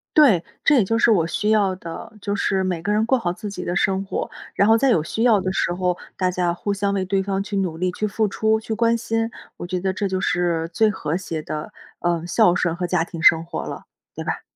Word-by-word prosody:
对， 240 - +6 0.2
这 315 - +5
也 240 - +5
就 225 +4 0
是 235 - +4
我 180 -7 +4
需 210 +5 -1
要 200 -3 +3
的， 170 +2 -8
就 200 +1 -2
是 195 -1 0
每 180 -3 -2
个 205 - 0
人 215 +1 +2
过 260 +3 +3
好 175 -7 -2
自 210 +2 -7
己 180 -2 -6
的 175 - -2
生 195 +1 +1
活， - - -3 0.2
然 200 - +3
后 225 - +6
在 270 +2 +3
有 170 - +3
需 225 +8 -2
要 220 -5 +4
的 185 - -1
时 175 -2 0
候， 180 -1 -1 0.2
大 185 -1 +1
家 180 -1 0
互 200 +3 -3
相 200 0 0
为 195 -1 0
对 190 +1 0
方 195 0 -1
去 200 0 -4
努 180 -4 -1
力、 180 0 0
去 210 - -3
付 215 +1 0
出、 220 +2 +1
去 220 0 -4
关 230 +1 +3
心， 225 0 -1 0.3
我 - - -6
觉 180 +1 -2
得 190 +1 0
这 200 +1 -2
就 190 0 -2
是， 170 -3 0
最 220 +3 +3
和 170 -4 -2
谐 165 -4 -5
的， 150 0 -6 0.3
呃， 170 -1 0
孝 175 0 +4
顺 175 -1 0
和 180 0 -2
家 175 -1 +1
庭 165 -1 -8
生 165 0 +6
活 170 - -5
了， - - -7 0.3
对 - - -5
吧？ - - -3
190 Hz, 275 characters per minute, -22 LUFS, 175-215 Hz, 0.3 s, 对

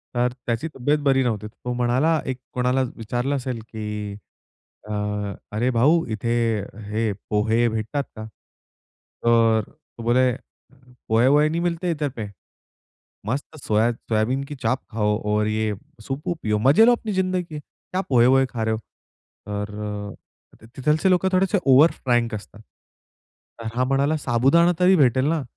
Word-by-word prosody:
तर 120 0 +1
त्याची 120 +7 -1
तब्येत 145 +4 +1
बरी 135 -1 +4
नव्हती. 110 -3 -2
तो 125 +3 -6
म्हणाला 130 +7 +2
एक 130 -1 -3
कोणाला 125 +1 +1
विचारलं 120 +5 -2
असेल 125 -3 -3
की 105 -2 -5 0.7
अ, - - -6 0.6
"अरे 115 +4 0
भाऊ, 150 +8 +3
इथे 110 +2 -3 0.6
हे 110 0 0 0.2
पोहे 110 +3 +2
भेटतात 115 +6 -2
का?" 110 - -7 1.0
तर 115 -1 +4
तो 140 -6 -14
बोले, 125 +2 +3 0.8
पोहा-वोहे 130 +7 +4
नहीं 170 +2 -1
मिलते 175 0 -1
इतर 150 -3 -1
पे! 110 - -3 1.0
मस्त 140 +6 -3
सोया 110 +2 +2
सोयाबीन 120 +4 -1
की 145 - -5
चाप 130 0 -1
खाओ 105 -1 +1
और 105 0 +1
ये 110 0 0 0.3
सूप-वूप 150 +6 -4
पियो, 105 -1 +1
मजे 140 - +6
लो 245 - +6
अपनी 220 -2 -5
जिंदगी 185 -1 0
के. 155 -3 -8
क्या 185 +5 -6
पोहा-वोहे 130 +1 +5
खा 115 -3 -3
रहे 110 0 +1
हो?" 110 - -6 0.7
तर 105 0 -4 0.8
अ, - - -14
तिथलचे 155 +7 +2
लोकं 185 +1 +3
थोडेसे 190 +1 +2
ओवर 140 +5 +6
फ्रैंक 120 -3 0
असतात. 105 +1 -10 1.0
तर 115 - -5
हा 125 - +2
म्हणाला, 140 +3 +1
"साबुदाणा 140 +8 +3
तरी 185 +1 +5
भेटेल 130 -3 +3
ना?" 160 -4 0
125 Hz, 150 wpm, -23 LUFS, 110-150 Hz, 1.0 s, मजे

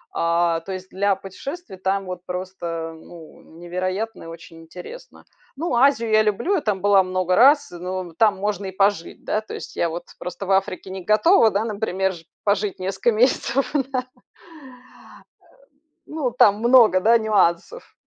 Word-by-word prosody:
А, 170 0 +1
то 190 - -8
есть, 185 0 -7
для 200 +1 +1
путешествий 270 - -8
там 195 +1 -1
вот 180 -1 -7
просто, 175 -3 -5
ну, 160 0 -14 0.2
невероятно 185 +5 -4
и - - -10
очень 165 0 -12
интересно. 185 - -12 0.3
Ну, 315 -1 -3
Азию 235 -3 +3
я 215 0 +5
люблю, 215 - 0
я 365 - +1
там 200 -4 -2
была 200 -1 +5
много 185 -1 -1
раз, 280 +2 +5
но 180 0 -6
там 205 +2 +2
можно 200 -1 -3
и 190 - -5
пожить, 195 -3 -1
да. 215 - -1
То 220 - -9
есть - - -9
я 170 - 0
вот 170 +2 -6 0.2
просто 180 +2 -6
в 195 - -2
Африке 190 -1 -1
не 190 -1 -7
готова 225 - +4
да, 200 +1 -1
например, 195 -3 -2
жи 165 -2 -13 0.2
пожить 200 -1 0
несколько 190 +5 0
месяцев, 245 +3 +1 0.2
да. 255 -1 -1 2.0
Ну, 295 -6 -3
там 205 -3 +4
много, 235 -5 +5
да, 230 +4 +5
нюансов. 215 - 0
195 Hz, 160 wpm, -22 LUFS, 180-225 Hz, 2.0 s, я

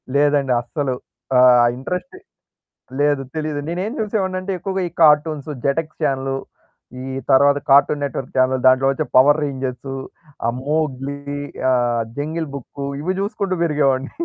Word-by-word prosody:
లేదండి 145 -2 +3
అస్సలు 130 +2 -3 0.4
ఆ! - - +6 0.4
ఇంట్రెస్ట్ 180 - -5 0.8
లేదు 145 -1 +2
తెలీదు. 155 -2 -2
నేనేం 185 +5 -2
చూసేవాడినంటే 195 -3 -2
ఎక్కువగా, 190 +2 -3
ఈ - - -25
కార్టూన్స్, 150 -1 +4 0.2
జెటెక్స్ 155 +3 -1
చానెల్, 135 0 0 0.6
ఈ - - -6 0.3
తరువాత 140 +1 +5
కార్టూన్ 140 +1 +5
నెట్వర్క్ 135 -2 -4
చానెల్, 130 0 +2
దాంట్లో 130 +1 +5
వచ్చే 155 +3 -2
పవర్ 145 +4 +6
రేంజర్స్, 135 -1 -4 0.5
ఆ! - - +3
మోగ్లి, 140 -2 -2 0.5
ఆ! - - +4 0.4
జంగిల్ 155 +2 -3
బుక్ 140 +1 -9 0.2
ఇవి 185 +4 -1
జుసుకుంటూ 200 -2 -2
పెరిగేవాడిని. 140 -4 +1
145 Hz, 125 wpm, -20 LUFS, 135-160 Hz, 0.8 s, ఆ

